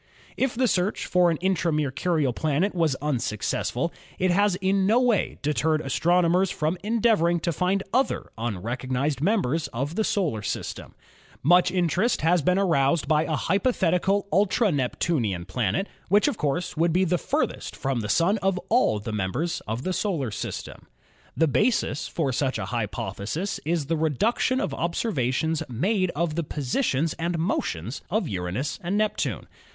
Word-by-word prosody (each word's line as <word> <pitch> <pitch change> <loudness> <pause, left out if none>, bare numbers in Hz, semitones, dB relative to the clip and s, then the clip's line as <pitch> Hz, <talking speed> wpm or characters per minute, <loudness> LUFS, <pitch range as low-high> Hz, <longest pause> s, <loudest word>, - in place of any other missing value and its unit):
If 265 -2 0
the 255 +1 +2
search 185 0 0
for 180 -1 +3
an 165 - 0
intra 185 -3 +1
Mercurial 150 -1 0
planet 155 - 0
was 165 -6 +1
unsuc 120 -8 -1
cessful, - - -1 0.3
it 185 0 +2
has 200 +1 +3
in 190 +1 +1
no 225 +4 +4
way 245 -6 +1
deterred 155 +1 +1
astronomers 175 +5 +2
from 155 +3 -1
en 225 +2 0
deavoring 175 -7 +3
to 170 - +1
find 185 +5 0
other 260 +3 0
unrecognised 125 +6 -2
members 165 - +1
of 135 +6 -3
the 220 - 0
solar 165 - 0
system. - - -5 0.5
Much 175 +5 +5
interest 180 +5 +1
has 170 +2 +3
been 180 +6 +2
aroused 165 -6 +2
by 155 +1 +3
a 160 - -1
hypothetical 195 - +1
ultra 205 +2 +3
Neptunian 125 - -1
planet, 105 - -1 0.2
which 205 +7 +4
of 290 - 0
course 150 0 -2
would 165 +2 +2
be 180 +3 +3
the 180 -1 +1
furthest - - -2
from 135 -2 -1
the 105 -2 -4
Sun 190 - +3
of 195 -1 +1
all 225 - +3
the 110 +1 -5
members 115 - -2
of 115 +4 -3
the 185 - -1
solar 165 - -1
system. 100 - -6 0.5
The 160 - +4
basis 210 - +1
for 145 -5 -1
such 130 +1 0
a - - -3
hypothesis 110 - -3
is 165 -2 0
the 165 +3 -1
reduction 210 - +1
of - - -2
observations 160 - -1
made 185 - 0
of 165 0 0
the 170 +2 -1
positions 150 - -1
and 170 +1 -1
motions 130 - -2
of 215 +6 0
Uranus 95 +9 -3
and 180 +4 -1
Neptune. 215 0 -1
165 Hz, 160 wpm, -25 LUFS, 135-190 Hz, 0.5 s, Much